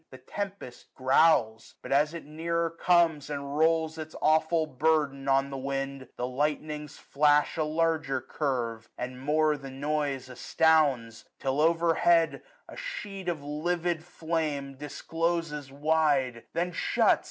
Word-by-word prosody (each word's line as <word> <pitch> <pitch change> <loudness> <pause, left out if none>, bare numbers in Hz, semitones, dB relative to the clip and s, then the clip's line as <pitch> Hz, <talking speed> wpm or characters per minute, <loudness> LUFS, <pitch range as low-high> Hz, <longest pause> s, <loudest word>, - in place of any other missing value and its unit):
The 130 - -11
tempest 195 -2 -7
growls; 130 -5 +3
but - - -8
as 150 +4 +3
it 170 - -7
nearer 165 +2 -2
comes 165 -4 +2
And 140 -1 -4
rolls 160 0 +2
its 155 0 -7
aweful 160 +1 +3
burden 145 -1 0
on 135 0 +2
the 135 - -4
wind, 135 0 -3
^^35 130 - -12
The 125 - -3
lightnings 150 +2 -2
flash 145 +1 +2
a 160 - 0
larger 160 -3 0
curve, 120 -6 -3
and 125 +1 -6
more 155 +2 +2
The 135 -1 -9
noise 140 -1 -2
astounds: 130 -3 +1
till 135 +2 -1
over 165 +1 +3
head 165 -1 +3 0.3
a - - -11
sheet 205 - -5
Of 155 -4 -3
livid 170 +3 -1
flame 155 -5 -3
discloses 150 0 -3
wide; 145 -5 +1
then 175 +1 -1
shuts. - - +2
150 Hz, 140 wpm, -28 LUFS, 135-165 Hz, 0.3 s, growls